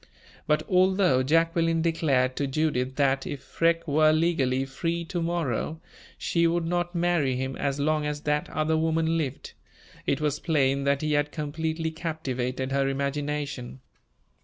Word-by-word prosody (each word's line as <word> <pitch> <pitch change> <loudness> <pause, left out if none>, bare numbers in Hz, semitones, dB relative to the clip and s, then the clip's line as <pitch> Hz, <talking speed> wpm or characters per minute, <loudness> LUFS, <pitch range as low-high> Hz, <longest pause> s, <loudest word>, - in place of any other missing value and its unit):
But, 150 - +2
although 185 -6 +3
Jacqueline 165 +3 +2
declared 135 -6 +1
to 140 - 0
Judith 135 -3 0
that, 135 -1 +1
if 140 -2 -6
Freke 165 0 0
were 155 +1 +4
legally 145 -5 +1
free 165 +5 -3
to 175 +1 -3
morrow, 165 -2 -2 0.4
she 170 -1 +1
would 170 0 0
not 175 +1 -1
marry 170 -6 +1
him 130 +1 -3
as 140 0 -2
long 150 +1 +1
as 150 0 -3
that 150 0 -1
other 155 +1 0
woman 160 0 +1
lived, 145 -5 -3 0.5
it 140 - +1
was 150 -1 -1
plain 140 -4 +1
that 140 +1 +1
he 155 0 0
had 145 0 +1
completely 160 +2 -3
captivated 130 -6 -3
her 135 0 +1
imagination. 140 -2 -3
150 Hz, 150 wpm, -26 LUFS, 135-165 Hz, 0.5 s, were